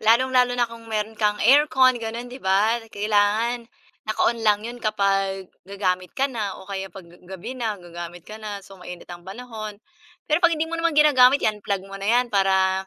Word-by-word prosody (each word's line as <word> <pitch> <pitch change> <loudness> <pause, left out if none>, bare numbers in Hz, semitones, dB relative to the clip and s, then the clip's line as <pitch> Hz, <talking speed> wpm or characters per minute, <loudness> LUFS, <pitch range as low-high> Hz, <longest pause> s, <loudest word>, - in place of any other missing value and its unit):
Lalong-lalo 250 +2 +3
na 240 -1 +1
kung 230 0 -12
meron 220 0 -3
kang 210 -1 +1
aircon 260 0 +5
gano'n 230 +2 -5
'di 255 +2 -9
ba 205 +5 +3
kailangan 215 +3 +1 0.4
naka-on 230 +2 +1
lang 210 -1 +4
'yun 240 +1 -6
kapag 195 -3 0 0.2
gagamit 185 -2 -2
ka 275 - +2
na 210 -6 -3
o - - -12
kaya 195 -1 -4
'pag 185 -1 -12 0.2
gabi 190 +6 -7
na, 220 -4 -2
gagamit 175 -1 -9
ka 215 - -9
na 205 -2 -6
so 195 - -14
mainit 180 -1 -10
ang 175 0 -11
panahon. 215 -1 -7 0.5
Pero 305 +3 +2
'pag 345 -2 +4
hindi 315 +1 -1
mo 335 - -3
naman 330 -2 0
ginagamit 280 -3 +6
'yan 215 -1 0
unplug 200 -2 -2
mo 195 - -11
na 195 - -4
'yan 245 +2 +3
para 190 -1 +2
215 Hz, 190 wpm, -23 LUFS, 195-245 Hz, 0.5 s, ginagamit